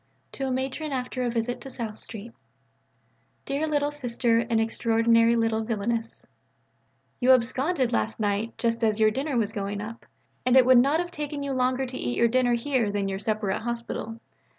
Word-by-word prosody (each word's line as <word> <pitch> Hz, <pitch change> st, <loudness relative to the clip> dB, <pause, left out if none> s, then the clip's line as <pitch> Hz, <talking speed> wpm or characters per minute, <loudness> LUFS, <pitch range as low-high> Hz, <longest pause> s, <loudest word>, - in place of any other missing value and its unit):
(To 270 Hz, -, -3 dB
a -, -, -1 dB
Matron 265 Hz, +4 st, -2 dB
after 255 Hz, -1 st, -3 dB
a 245 Hz, -, 0 dB
visit 235 Hz, +1 st, -2 dB
to 270 Hz, -, -8 dB
South 230 Hz, -4 st, -5 dB
Street.) 225 Hz, +1 st, -8 dB, 1.1 s
DEAREST 295 Hz, +3 st, -1 dB
LITTLE 290 Hz, 0 st, +1 dB
SISTER 240 Hz, -4 st, +1 dB
AND 230 Hz, -1 st, 0 dB
EXTRAORDINARY 230 Hz, +1 st, +3 dB
LITTLE 225 Hz, -1 st, +1 dB
VILLAINESS 225 Hz, +1 st, -3 dB, 0.9 s
You 260 Hz, +1 st, +6 dB
absconded 255 Hz, +2 st, +1 dB
last 220 Hz, 0 st, -1 dB
night 210 Hz, +2 st, -1 dB
just 230 Hz, 0 st, -1 dB
as 215 Hz, -1 st, +2 dB
your 215 Hz, 0 st, +5 dB
dinner 270 Hz, +3 st, -2 dB
was 220 Hz, -2 st, 0 dB
going 200 Hz, -1 st, -3 dB
up, 225 Hz, +3 st, -8 dB, 0.4 s
and 255 Hz, +1 st, +4 dB
it 255 Hz, -, +7 dB
would 255 Hz, -1 st, +7 dB
not 280 Hz, +6 st, +3 dB
have 350 Hz, 0 st, -3 dB
taken 295 Hz, -3 st, -4 dB
you 280 Hz, -, -3 dB
longer 255 Hz, +1 st, +1 dB
to 255 Hz, 0 st, -6 dB
eat 120 Hz, 0 st, -2 dB
your 235 Hz, -, +4 dB
dinner 245 Hz, 0 st, +3 dB
here 235 Hz, -3 st, 0 dB
than 200 Hz, -1 st, -1 dB
your 195 Hz, 0 st, -3 dB
supper 210 Hz, -1 st, -1 dB
at 205 Hz, -, -2 dB
hospital. 235 Hz, -1 st, -4 dB
235 Hz, 185 wpm, -26 LUFS, 225-260 Hz, 1.1 s, it